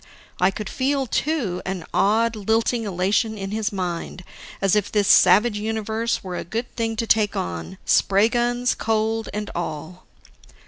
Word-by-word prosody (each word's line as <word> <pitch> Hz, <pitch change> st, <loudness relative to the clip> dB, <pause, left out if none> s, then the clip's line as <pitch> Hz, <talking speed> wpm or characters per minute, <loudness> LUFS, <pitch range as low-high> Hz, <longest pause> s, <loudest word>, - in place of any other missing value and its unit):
I 185 Hz, -, +4 dB
could 205 Hz, +1 st, -5 dB
feel, 275 Hz, 0 st, 0 dB
too, 240 Hz, -, -1 dB
an 185 Hz, -4 st, -4 dB
odd, 225 Hz, +3 st, +2 dB
lilting 225 Hz, +2 st, 0 dB
elation 205 Hz, +4 st, 0 dB
in 195 Hz, -1 st, -5 dB
his 215 Hz, 0 st, -1 dB
mind, 180 Hz, -2 st, -4 dB, 0.4 s
as 195 Hz, 0 st, +2 dB
if 210 Hz, -1 st, 0 dB
this 205 Hz, -2 st, +1 dB
savage 210 Hz, +4 st, +5 dB
universe 220 Hz, +1 st, -2 dB
were 185 Hz, -2 st, -5 dB
a -, -, -4 dB
good 230 Hz, +7 st, -5 dB
thing 225 Hz, -1 st, -1 dB
to 230 Hz, -, -2 dB
take 215 Hz, -2 st, +2 dB
on 85 Hz, -, -4 dB
spray 200 Hz, +2 st, +4 dB
guns, 240 Hz, +1 st, +1 dB
cold, 220 Hz, 0 st, -1 dB
and 210 Hz, 0 st, -4 dB
all. 165 Hz, +1 st, -6 dB
215 Hz, 155 wpm, -23 LUFS, 190-225 Hz, 0.4 s, savage